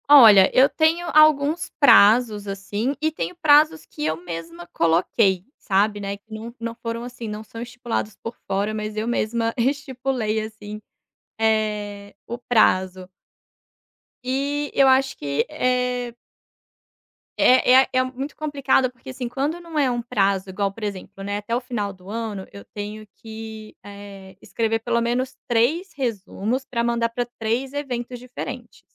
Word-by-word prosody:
Olha, 220 -10 +9
eu 265 +2 +6
tenho 330 +3 +1
alguns 305 +1 +4
prazos, 215 -5 +5
assim, 205 +7 -3
e 315 0 +1
tenho 340 +3 -4
prazos 310 0 +5
que 150 - -8
eu 155 0 0
mesma 170 0 -8
coloquei, 180 +3 +2
sabe, 205 +1 +1
né, 200 0 -4
que 215 +2 -16
não 225 +2 -7
não 230 0 -4
foram 230 0 -5
assim, 245 -1 -7
não 210 0 -6
são 230 +1 -10
estipulados 240 -3 -4
por 230 - -6
fora 200 +2 -1
mas 215 0 -4
eu 215 +2 -1
mesma 230 -1 0
estipulei 255 -4 -1
assim, 215 -1 -9 0.6
eh, 210 -2 -1
o 235 - -4
prazo. 185 -6 +1 1.1
E, 280 +3 -2
eu 275 - +5
acho 265 0 +3
que 140 0 -1
é 250 -4 -1 1.2
é 255 0 +5
é - - -8
é 255 0 +3
muito 265 +3 -6
complicado, 275 -4 +1
porque, 250 +1 -14
assim, 255 -1 -5
quando 285 +7 -2
não 330 -3 -4
é 275 -3 +3
um 240 -1 -1
prazo 200 -5 0
igual, 195 +1 -1
por 215 +3 -11
exemplo, 195 -1 -6
né, 205 +1 -2
até 210 +3 -3
o 245 - -1
final 225 -6 -3
do 185 0 -15
ano 215 -3 -4
eu 100 0 -11
tenho 210 +1 -6
que, 220 -1 -9
eh, 200 -2 -11
escrever 225 0 -1
pelo 235 +1 0
menos 255 +3 -1
3 280 +11 +1
resumos 235 0 -2
pra 235 -3 -2
mandar 235 0 +1
para 245 +1 -2
3 235 +5 -1
eventos 250 -4 -4
diferentes 250 0 -8
230 Hz, 155 wpm, -23 LUFS, 205-255 Hz, 1.2 s, Olha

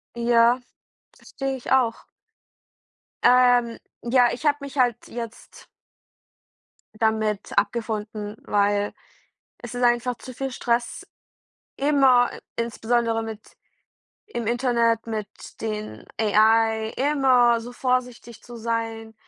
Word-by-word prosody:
Ja, 235 +1 +4 0.6
verstehe 270 -1 -5
ich 255 - -4
auch. 250 -4 +1 1.2
Ähm, 245 -2 +4 0.3
ja, 245 +1 +4
ich 275 - -6
habe 290 -1 +3
mich 280 0 -8
halt 245 -3 +3
jetzt 230 -1 -9 1.3
damit 220 -2 0
abgefunden, 215 -2 -2
weil 205 0 +1 0.7
es 240 -1 -9
ist 245 - -3
einfach 240 +1 +2
zu 255 - -10
viel 270 +2 -4
Stress, 240 -1 -2 0.7
immer 270 -4 +4 0.3
insbesondere 230 0 0
mit 220 -1 -7 0.9
im 240 - -5
Internet, 235 -1 +1
mit 215 -2 -3 0.3
den 215 -1 -5 0.2
AI, 220 +1 +3
immer 260 -4 +3
so 240 +2 -9
vorsichtig 250 -2 -2
zu 240 -1 -11
sein, 225 -1 -4
235 Hz, 105 wpm, -24 LUFS, 225-250 Hz, 1.3 s, Ja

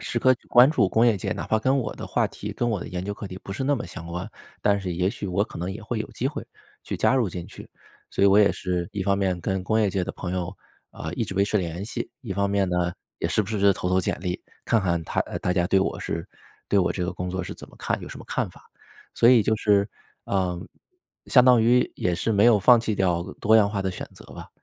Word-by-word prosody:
时 120 - -2
刻 130 +2 +5
关 125 +4 +7
注 115 -12 +2
工 115 +4 +3
业 115 - +4
界， 95 - -4
哪 - - -5
怕 110 - +2
跟 130 +5 +2
我 115 -4 -3
的 - - -6
话 - - +1
题、 - - -7
跟 120 - -1
我 105 - 0
的 - - -6
研 90 0 -4
究 100 - -3
课 100 - -7
题 95 - -8
不 95 - -7
是 130 +6 -3
那 145 +1 +2
么 125 - -4
相 85 - -9
关， 90 +2 -5 0.3
但 100 -1 +3
是 90 -2 -3
也 90 +3 +1
许 100 - -6
我 95 +2 +1
可 - - -10
能 90 +2 -3
也 105 +2 -8
会 110 +1 -3
有 110 - -4
机 130 - -1
会 150 - -6 0.4
去 - - -4
加 130 - +3
入 120 -7 +2
进 85 -1 -6
去。 - - -12 0.4
所 - - -1
以 - - +7
我 100 +1 +6
也 105 - +6
是 90 -2 -3
一 100 - -2
方 100 0 +1
面 95 -2 0
跟 95 +1 -2
工 110 +3 +1
业 100 -3 +2
界 90 -1 -1
的 95 - -5
朋 90 -1 -5
友， 90 +1 -3 0.3
啊， 80 +2 -6
一 115 - -1
直 95 - -6
维 100 - +3
持 105 +1 +1
联 85 +2 -4
系， 115 - -4
一 110 -7 -5
方 100 +1 0
面 100 -1 +1
呢， 90 0 0 0.3
也 - - -1
时 105 - +2
不 100 - -8
时 110 -2 -2
地 100 0 +5
投 90 -1 -3
投 95 0 +3
简 - - -1
历， 90 -1 -3 0.2
看 115 - +2
看 85 -3 0
他 - - -1
呃， - - -3
大 90 - 0
家 90 -1 +1
对 95 - +3
我 - - -1
是 85 +2 -4 0.4
对 100 - +3
我 90 - +2
这 90 - -2
个 90 - -2
工 90 0 -4
作 95 +1 -3
是 - - -6
怎 - - -12
么 - - -17
看 - - -2
有 - - -8
什 - - -9
么 - - -10
看 - - -1
法， - - -18 0.5
所 115 - +5
以 120 -4 +7
就 110 - +2
是 100 -1 +2 0.4
呃， 90 -3 -1 0.7
相 125 -2 +6
当 125 -2 +6
于 125 +2 +3
也 90 -1 0
是 100 +6 -1
没 100 +1 +4
有 115 -3 +6
放 120 +4 +6
弃 110 -2 -1
掉 90 -3 +1 0.2
多 110 +2 +5
样 105 -2 +5
化 100 -2 -2
的 95 - -1
选 90 - -6
择 - - -14
吧。 - - -10
100 Hz, 305 characters per minute, -25 LUFS, 90-110 Hz, 0.7 s, 关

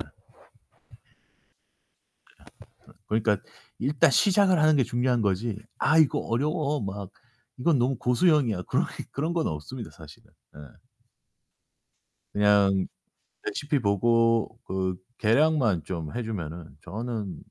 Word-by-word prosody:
예 - - -13 2.8
그러니까 110 -1 +1 0.4
일단 140 0 +3
시작을 195 +2 +4
하는 155 0 +5
게 135 - +3
중요한 120 0 0
거지 105 +2 0 0.2
'아 160 - +3
이거 155 -4 +4
어려워.' 150 +4 -1
막 100 -1 -6 0.5
'이건 145 +4 +2
너무 130 +3 +1
고수용이야.' 125 - +2
그런 - - 0
게 - - -6
그런 155 +5 -2
건 165 -2 0
없습니다, 105 +10 -6
사실은. 75 -2 -15 0.2
예. - - -11 1.7
그냥 100 -2 +3 0.6
레시피 145 -1 -1
보고 115 +1 +2
그 95 -1 -2 0.2
계량만 115 - +2
좀 80 -4 -5
해 120 - -1
주면은 85 -8 -6
저는 110 -6 -5
115 Hz, 225 characters per minute, -26 LUFS, 95-140 Hz, 2.8 s, 하는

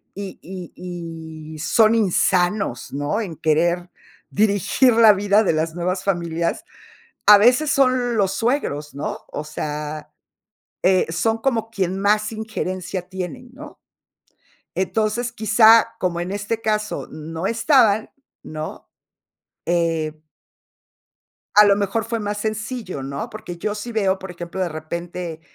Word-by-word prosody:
y 200 -1 -7
y 180 -1 -9 0.8
y - - -10
son 220 +7 +4
insanos, 185 - +1
¿no?, 145 +10 -1
en 175 -7 -5
querer 170 +3 +1 0.4
dirigir 205 +4 +3
la 225 -2 +7
vida 205 +2 +3
de 185 - +2
las 160 +1 -1
nuevas 180 +2 -2
familias, 170 -3 -1 0.6
a 210 0 +10
veces 255 +8 +4
son 255 -3 +2
los 195 -3 +2
suegros, 195 - -1
¿no? 140 - -3
O 150 - -4
sea, 150 0 -5 0.7
eh, 185 0 +4
son 220 +7 +1
como 225 -2 0
quien 190 -3 -1
más 210 +2 +2
injerencia 185 -4 -4
tienen, 190 +7 -6
¿no? 295 +3 -11 1.0
Entonces, 220 +5 0
quizá, 225 +1 +5
como 175 -2 -1
en 180 +2 -4
este 205 +3 -3
caso, 215 -1 -1
no 160 +3 -5
estaban, 230 -3 +3 0.3
¿no? 155 0 -7 0.8
Eh 165 -3 0 1.4
a 210 - +9
lo 200 -1 +5
mejor 205 +2 -1
fue 230 0 -2
más 205 0 -3
sencillo, 215 - -4
¿no? 140 +1 -5
Porque 195 -5 -8
yo 210 +4 -2
sí 215 +3 -6
veo, 195 -4 +1
por 190 -1 -7
ejemplo, 175 +2 -6
de 180 - 0
repente 165 +1 -6
195 Hz, 130 wpm, -21 LUFS, 170-220 Hz, 1.4 s, a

